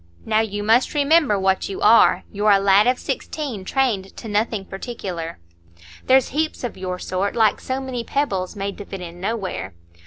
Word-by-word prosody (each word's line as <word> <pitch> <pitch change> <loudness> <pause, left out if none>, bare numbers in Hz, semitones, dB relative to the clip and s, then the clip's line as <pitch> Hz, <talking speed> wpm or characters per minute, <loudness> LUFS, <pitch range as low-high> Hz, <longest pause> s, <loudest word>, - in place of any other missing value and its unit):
Now, 220 0 +2
you 205 -2 -2
must 230 +7 +3
remember 290 -6 +3
what 190 0 0
you 195 - -5
are,—you're 210 -1 +4
a 200 - +7
lad 200 +2 +4
of 250 0 +3
sixteen, 270 -11 -4
trained 205 -4 -1
to 230 - -8
nothing 210 -1 -1
particular. 190 -5 -6 0.7
There's 260 0 +4
heaps 310 +1 -2
of 245 - -4
your 185 -1 -4
sort, 185 +2 -2
like 220 -3 +3
so 260 +1 -3
many 260 -3 -4
pebbles, 200 -11 -2
made 200 0 -4
to 205 - -7
fit 195 -1 -7
in 175 0 -9
nowhere. 190 - -3
210 Hz, 175 wpm, -22 LUFS, 190-245 Hz, 0.7 s, a